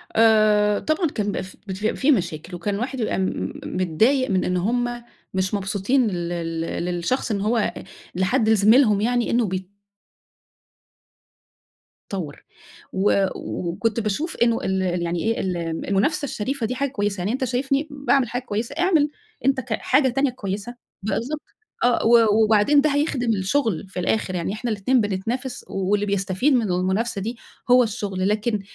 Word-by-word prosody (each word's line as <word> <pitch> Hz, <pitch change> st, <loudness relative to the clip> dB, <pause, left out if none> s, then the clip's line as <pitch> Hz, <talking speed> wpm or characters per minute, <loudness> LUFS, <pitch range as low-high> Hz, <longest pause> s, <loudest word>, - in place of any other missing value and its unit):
آآ 215 Hz, -2 st, +4 dB
طبعًا 310 Hz, +2 st, 0 dB
كان 215 Hz, -7 st, -3 dB
بيبقى 205 Hz, -, -2 dB
ف 185 Hz, -, -12 dB
بتبقى 200 Hz, +3 st, -2 dB
في 285 Hz, +3 st, +3 dB
مشاكل، 175 Hz, -, -1 dB
وكان 200 Hz, +3 st, -2 dB
واحد 260 Hz, +2 st, -3 dB
يبقى 220 Hz, -, -1 dB
م -, -, 0 dB
م 190 Hz, -, -3 dB
م -, -, -5 dB
متضايق 220 Hz, -, +2 dB
من 185 Hz, -1 st, +2 dB
إن 180 Hz, -, 0 dB
هُم 240 Hz, +5 st, -1 dB, 0.3 s
مش 190 Hz, +1 st, -1 dB
مبسوطين 205 Hz, +6 st, +1 dB
لل 175 Hz, -4 st, -2 dB, 0.3 s
لل 165 Hz, +1 st, -3 dB
للشخص، 180 Hz, +8 st, -1 dB
إن 200 Hz, -, -1 dB
هو 220 Hz, +1 st, +1 dB, 0.4 s
لحد 215 Hz, +5 st, +2 dB
لزميلهم 215 Hz, 0 st, +5 dB
يعني، 240 Hz, +1 st, +1 dB
إنّه 235 Hz, -1 st, +2 dB
بي 185 Hz, -1 st, -4 dB, 2.4 s
طوّر 170 Hz, -8 st, -5 dB, 0.5 s
و 195 Hz, 0 st, +3 dB
وكنت 210 Hz, +6 st, -2 dB
باشوف 225 Hz, -, -2 dB
إنّه 235 Hz, -1 st, +2 dB
ال 190 Hz, 0 st, 0 dB, 0.2 s
يعني 170 Hz, 0 st, -2 dB
إيه 225 Hz, +1 st, 0 dB
ال 185 Hz, -2 st, -1 dB, 0.3 s
المنافسة 275 Hz, -, +1 dB
الشريفة 255 Hz, 0 st, -3 dB
دي 250 Hz, +3 st, -2 dB
حاجة 280 Hz, +2 st, -1 dB
كويّسة 205 Hz, -6 st, -2 dB
يعني. 195 Hz, +5 st, -1 dB
أنت 260 Hz, +1 st, -2 dB
شايفني 270 Hz, +4 st, 0 dB
باعمل 280 Hz, -3 st, +1 dB
حاجة 245 Hz, +2 st, -2 dB
كويّسة، 230 Hz, +3 st, -3 dB
اعمل 335 Hz, -5 st, +3 dB, 0.4 s
أنت 270 Hz, 0 st, +3 dB
ك 235 Hz, -2 st, -4 dB
حاجة 265 Hz, +4 st, +2 dB
تانية 270 Hz, +3 st, +1 dB
كويّسة. 210 Hz, 0 st, -5 dB, 0.3 s
بالضبط 260 Hz, +8 st, -2 dB, 0.4 s
آه، 245 Hz, -2 st, +3 dB
و 225 Hz, -2 st, +5 dB
وبعدين 220 Hz, +7 st, +4 dB
ده 305 Hz, -, +2 dB
هيخدم 280 Hz, -5 st, 0 dB
الشغل 215 Hz, -, 0 dB
في 185 Hz, -, -5 dB
الآخر 185 Hz, 0 st, 0 dB
يعني، 175 Hz, +2 st, -2 dB
إحنا 230 Hz, +2 st, -3 dB
الاتنين 225 Hz, +5 st, +2 dB
بنتنافس، 225 Hz, +6 st, -3 dB
واللي 200 Hz, +2 st, 0 dB
بيستفيد 200 Hz, +7 st, +1 dB
من 250 Hz, -, +4 dB
المنافسة 190 Hz, +4 st, 0 dB
دي 230 Hz, +4 st, -4 dB, 0.3 s
هو 250 Hz, 0 st, +7 dB
الشغل، 200 Hz, -4 st, -2 dB
لكن 210 Hz, +1 st, 0 dB
215 Hz, 160 wpm, -23 LUFS, 190-250 Hz, 2.4 s, هو